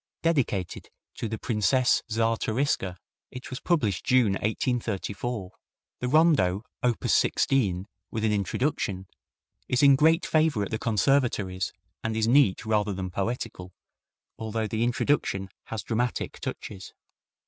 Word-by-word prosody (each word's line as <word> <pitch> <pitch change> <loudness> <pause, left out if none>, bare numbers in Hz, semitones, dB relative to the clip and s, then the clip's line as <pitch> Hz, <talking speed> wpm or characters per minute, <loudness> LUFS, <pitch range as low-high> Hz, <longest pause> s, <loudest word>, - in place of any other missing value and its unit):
Dedicated 135 - 0 0.2
to 115 - -4
the 110 - -3
Princesse 115 +3 +2
Czartoryska, 115 -3 0 0.3
it 130 +1 -9
was 130 - -4
published 115 - 0
June, 125 -5 +4
1834. 110 -1 -2 0.5
The 125 - -2
Rondo, 135 - +3 0.2
op. 120 -2 0
16, 100 -9 +2 0.2
with 110 0 -2
an 110 - +2
Introduction, 100 -1 -1 0.6
is 125 +2 +1
in 140 -1 +8
great 160 +5 +4
favor 155 -9 +2
at 100 - -5
the 110 - -2
conservatories, 105 -5 +1 0.3
and 110 0 -2
is 110 0 +1
neat 120 -5 +4
rather 105 -2 +1
than 95 -1 -4
poetical, 100 -2 -4 0.7
although 110 0 -2
the 110 +2 -1
introduction 120 -5 0 0.2
has 110 -2 -5
dramatic 120 +1 -2
touches. 95 -2 -7
110 Hz, 125 wpm, -27 LUFS, 100-130 Hz, 0.7 s, in